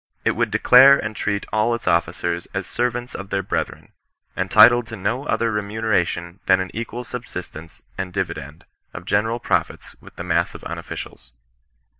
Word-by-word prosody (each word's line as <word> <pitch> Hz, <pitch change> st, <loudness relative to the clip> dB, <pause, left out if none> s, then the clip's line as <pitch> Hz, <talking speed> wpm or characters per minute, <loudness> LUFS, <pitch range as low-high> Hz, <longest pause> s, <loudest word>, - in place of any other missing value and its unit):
It -, -, +4 dB
would 120 Hz, -1 st, 0 dB
declare 125 Hz, +6 st, +7 dB
and 105 Hz, 0 st, -4 dB
treat 100 Hz, -1 st, -2 dB
all 110 Hz, +2 st, +2 dB
its 115 Hz, -, -9 dB
officers 85 Hz, -1 st, 0 dB
as -, -, -2 dB
servants 120 Hz, 0 st, -2 dB
of 100 Hz, -1 st, -7 dB
their 100 Hz, 0 st, -1 dB
brethren, 95 Hz, -, -4 dB, 0.4 s
entitled 120 Hz, -1 st, +6 dB
to 115 Hz, -, -7 dB
no 115 Hz, +7 st, -2 dB
other 115 Hz, -1 st, +1 dB
remune 105 Hz, +1 st, -3 dB
ration 85 Hz, -2 st, 0 dB
than 95 Hz, -, +5 dB
an 95 Hz, 0 st, -4 dB
equal 115 Hz, +2 st, -5 dB
subsistence 80 Hz, -7 st, -8 dB, 0.2 s
and 95 Hz, -1 st, -3 dB
dividend 80 Hz, -5 st, -5 dB, 0.3 s
of 90 Hz, -, -8 dB
general 110 Hz, +4 st, +1 dB
profits -, -, -2 dB
with -, -, -15 dB
the -, -, -6 dB
mass -, -, 0 dB
of -, -, -10 dB
unofficials. -, -, -8 dB
105 Hz, 165 wpm, -22 LUFS, 95-115 Hz, 0.4 s, declare